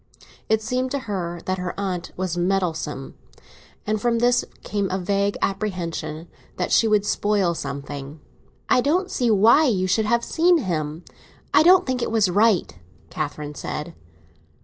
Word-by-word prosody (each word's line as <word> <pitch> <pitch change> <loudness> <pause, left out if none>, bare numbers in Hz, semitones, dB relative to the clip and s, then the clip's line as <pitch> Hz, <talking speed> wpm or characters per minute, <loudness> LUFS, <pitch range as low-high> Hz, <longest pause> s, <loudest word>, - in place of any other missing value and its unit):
It 220 0 +2
seemed 255 +2 -1
to 280 - -2
her 175 -5 -4
that 185 0 -1
her 180 +1 -4
aunt 185 -3 -3
was 185 -2 -2
meddlesome; 175 -6 -2 0.7
and 215 0 -1
from 240 -1 +1
this 245 +1 +3 0.2
came 200 -2 -2
a 190 - -1
vague 200 +2 0
apprehension 170 -5 -3 0.3
that 180 - -2
she 225 - +4
would 210 -2 +2
spoil 205 -4 +1
something. 140 0 -6 0.5
"I 250 - +4
don't 350 +8 0
see 245 -2 0
why 225 +9 +5
you 190 -6 +1
should 200 +4 +1
have 235 +2 +1
seen 345 +2 +3
him. 165 - -3 0.5
I - - +7
don't 365 +3 +6
think 255 -2 -1
it - - -1
was 215 -5 +2
right," 205 - +2 0.4
Catherine 150 -1 -4
said. 150 +2 -5
195 Hz, 155 wpm, -23 LUFS, 170-230 Hz, 0.7 s, I